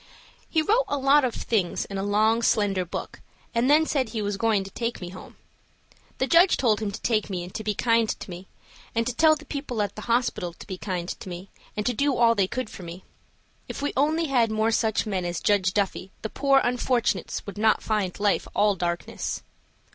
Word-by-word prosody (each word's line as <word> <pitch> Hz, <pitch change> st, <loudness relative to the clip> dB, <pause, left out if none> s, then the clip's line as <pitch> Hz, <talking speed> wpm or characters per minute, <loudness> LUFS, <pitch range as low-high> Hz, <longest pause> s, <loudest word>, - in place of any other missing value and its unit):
He 320 Hz, -2 st, +2 dB
wrote 455 Hz, +9 st, +3 dB
a 285 Hz, -, -1 dB
lot 275 Hz, +2 st, +4 dB
of 250 Hz, -3 st, -1 dB
things 200 Hz, -7 st, -1 dB
in 195 Hz, -1 st, -5 dB
a -, -, -1 dB
long, 215 Hz, +3 st, +2 dB
slender 205 Hz, -5 st, +2 dB
book, 175 Hz, -, -6 dB, 0.3 s
and 235 Hz, +3 st, +2 dB
then 310 Hz, +2 st, +5 dB
said 265 Hz, -6 st, 0 dB
he 220 Hz, -1 st, -3 dB
was 205 Hz, 0 st, -1 dB
going 210 Hz, -1 st, +1 dB
to 195 Hz, -, -10 dB
take 235 Hz, +3 st, -3 dB
me 180 Hz, -, -6 dB
home. 185 Hz, +1 st, -12 dB, 0.8 s
The 265 Hz, -, +1 dB
judge 340 Hz, +7 st, +5 dB
told 220 Hz, -5 st, +2 dB
him 215 Hz, -, -1 dB
to 200 Hz, -, -6 dB
take 220 Hz, -3 st, 0 dB
me 180 Hz, -3 st, -3 dB
and 180 Hz, -, -10 dB
to 220 Hz, -, -5 dB
be 210 Hz, -1 st, -1 dB
kind 230 Hz, -1 st, +2 dB
to -, -, -5 dB
me, 180 Hz, +2 st, -9 dB, 0.5 s
and 230 Hz, 0 st, +1 dB
to 250 Hz, -, -1 dB
tell 310 Hz, +4 st, +5 dB
the 305 Hz, 0 st, -12 dB
people 280 Hz, -7 st, -4 dB
at 205 Hz, -2 st, -1 dB
the 215 Hz, -, -7 dB
hospital 230 Hz, -7 st, 0 dB
to -, -, -12 dB
be 185 Hz, -3 st, -7 dB
kind 180 Hz, -3 st, -3 dB
to 185 Hz, -, -6 dB
me, 180 Hz, +2 st, -8 dB, 0.3 s
and 210 Hz, -, -1 dB
to 250 Hz, -, +1 dB
do 280 Hz, +3 st, +1 dB
all 235 Hz, -1 st, +5 dB
they 200 Hz, -4 st, +1 dB
could 255 Hz, +3 st, -3 dB
for 195 Hz, -, -10 dB
me. 175 Hz, +1 st, -9 dB, 0.7 s
If -, -, -5 dB
we 285 Hz, -, -1 dB
only 310 Hz, +4 st, +2 dB
had 250 Hz, -6 st, +2 dB
more 220 Hz, +1 st, +1 dB
such 220 Hz, -1 st, +1 dB
men 195 Hz, -4 st, -2 dB
as 175 Hz, 0 st, -2 dB
Judge 195 Hz, -3 st, +2 dB
Duffy, 195 Hz, -1 st, -1 dB
the 220 Hz, -, -2 dB
poor 275 Hz, +2 st, +3 dB
unfortunates 245 Hz, 0 st, 0 dB
would 200 Hz, 0 st, -7 dB
not 220 Hz, 0 st, +3 dB
find 205 Hz, -5 st, -1 dB
life 205 Hz, 0 st, +1 dB
all 205 Hz, -1 st, +3 dB
darkness. 175 Hz, -1 st, -3 dB
220 Hz, 225 wpm, -25 LUFS, 195-250 Hz, 0.8 s, then